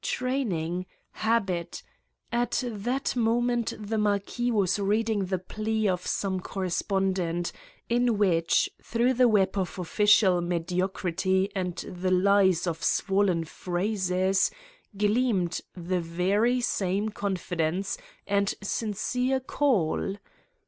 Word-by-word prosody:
Training? 185 Hz, -10 st, -1 dB, 0.2 s
Habit? 195 Hz, -7 st, -1 dB, 0.5 s
At 240 Hz, +2 st, 0 dB
that 245 Hz, +5 st, -2 dB
moment 240 Hz, 0 st, +1 dB
the 215 Hz, +1 st, -2 dB
mar 205 Hz, -1 st, +3 dB
quis 240 Hz, +5 st, -3 dB
was 205 Hz, -3 st, +1 dB
reading 210 Hz, 0 st, +1 dB
the 185 Hz, 0 st, -1 dB
plea 215 Hz, +4 st, -2 dB
of 180 Hz, -2 st, -1 dB
some 190 Hz, -2 st, -1 dB
correspondent, 185 Hz, -2 st, -1 dB, 0.4 s
in 240 Hz, -1 st, +2 dB
which, 170 Hz, -5 st, +3 dB
through 240 Hz, +2 st, +1 dB
the 250 Hz, 0 st, +4 dB
web 205 Hz, -4 st, +2 dB
of 185 Hz, 0 st, -3 dB
official 190 Hz, 0 st, +4 dB
mediocrity 185 Hz, +2 st, 0 dB
and 180 Hz, -2 st, -2 dB
the 185 Hz, +1 st, -4 dB
lies 190 Hz, -1 st, +4 dB
of 165 Hz, -2 st, -3 dB
swollen 190 Hz, -4 st, +2 dB
phrases, 185 Hz, +2 st, 0 dB, 0.5 s
gleamed 210 Hz, -4 st, +1 dB
the 180 Hz, +1 st, -2 dB
very 195 Hz, +9 st, +1 dB
same 200 Hz, -2 st, 0 dB
confidence 185 Hz, -3 st, -2 dB, 0.3 s
and 200 Hz, 0 st, +1 dB
sincere 250 Hz, +6 st, -1 dB
call. 230 Hz, -, 0 dB
195 Hz, 105 wpm, -27 LUFS, 180-220 Hz, 0.5 s, the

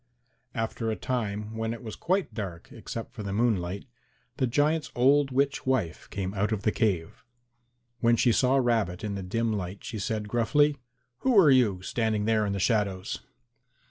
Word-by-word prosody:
After 115 Hz, 0 st, -2 dB
a 110 Hz, -, 0 dB
time 110 Hz, -4 st, -3 dB
when 115 Hz, +1 st, -2 dB
it 115 Hz, -, -12 dB
was 110 Hz, -2 st, -6 dB
quite 185 Hz, +2 st, 0 dB
dark 95 Hz, -7 st, -6 dB
except 115 Hz, +1 st, -7 dB
for 120 Hz, -, -7 dB
the 100 Hz, -1 st, -4 dB
moonlight, 100 Hz, -4 st, 0 dB, 0.5 s
the 130 Hz, -3 st, +1 dB
giant's 150 Hz, +5 st, +1 dB
old 135 Hz, +3 st, +4 dB
witch 135 Hz, +1 st, 0 dB
wife 110 Hz, -11 st, -1 dB
came 95 Hz, -1 st, -3 dB
out 105 Hz, +2 st, 0 dB
of 105 Hz, -2 st, -2 dB
the 110 Hz, -, +3 dB
cave. 95 Hz, -9 st, -1 dB, 0.8 s
When 115 Hz, 0 st, +4 dB
she 120 Hz, +1 st, +3 dB
saw 130 Hz, +3 st, +3 dB
Rabbit 115 Hz, -9 st, +1 dB
in 105 Hz, -1 st, -2 dB
the 100 Hz, -, -4 dB
dim 115 Hz, +4 st, -1 dB
light 95 Hz, -1 st, -4 dB
she 110 Hz, -, -5 dB
said 105 Hz, +1 st, -2 dB
gruffly, 120 Hz, +7 st, +2 dB, 0.4 s
"Who 255 Hz, -4 st, +2 dB
are 155 Hz, -7 st, +7 dB
you, 105 Hz, -8 st, +3 dB
standing 110 Hz, 0 st, 0 dB
there 110 Hz, -1 st, +2 dB
in 100 Hz, -, -1 dB
the 100 Hz, -, -2 dB
shadows?" 100 Hz, -2 st, 0 dB
110 Hz, 175 wpm, -28 LUFS, 100-125 Hz, 0.8 s, are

